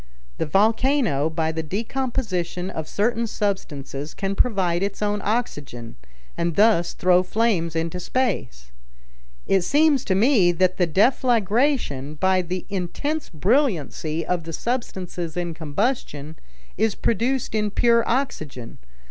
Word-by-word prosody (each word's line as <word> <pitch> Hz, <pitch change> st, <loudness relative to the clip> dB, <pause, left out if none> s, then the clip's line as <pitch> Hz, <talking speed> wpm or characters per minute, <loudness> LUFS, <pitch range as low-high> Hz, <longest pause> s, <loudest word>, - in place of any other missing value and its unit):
The -, -, -1 dB
volcano, 215 Hz, -, +2 dB
by 160 Hz, 0 st, -1 dB
the 160 Hz, 0 st, -3 dB
decomposition 195 Hz, -, -3 dB
of 160 Hz, -4 st, -5 dB
certain 230 Hz, +5 st, 0 dB
substances, 155 Hz, -9 st, -3 dB
can 195 Hz, 0 st, -2 dB
provide 190 Hz, -6 st, +1 dB
its 200 Hz, 0 st, -2 dB
own 205 Hz, 0 st, 0 dB
oxygen, 145 Hz, -, -3 dB, 0.4 s
and 170 Hz, -1 st, -1 dB
thus 205 Hz, -5 st, +4 dB
throw 180 Hz, 0 st, +4 dB
flames 185 Hz, -4 st, 0 dB
into 165 Hz, +2 st, -2 dB
space. 175 Hz, -, -2 dB, 0.7 s
It 195 Hz, -1 st, +3 dB
seems 290 Hz, -, +3 dB
to 190 Hz, -, +1 dB
me 200 Hz, -5 st, +4 dB
that 185 Hz, +1 st, +1 dB
the 180 Hz, -, +2 dB
deflagration, 215 Hz, -, +1 dB
by 190 Hz, -1 st, +3 dB
the 180 Hz, +1 st, -4 dB
intense 205 Hz, -, -3 dB
brilliancy 165 Hz, -, 0 dB
of 180 Hz, -2 st, -1 dB
the 165 Hz, -, -6 dB
substances 180 Hz, -8 st, -4 dB
in 175 Hz, -1 st, -2 dB
combustion, 160 Hz, -, -2 dB, 0.4 s
is 220 Hz, -1 st, +2 dB
produced 245 Hz, +2 st, 0 dB
in 210 Hz, -1 st, +1 dB
pure 235 Hz, +2 st, +3 dB
oxygen. 155 Hz, -, -3 dB
190 Hz, 125 wpm, -23 LUFS, 165-230 Hz, 0.7 s, thus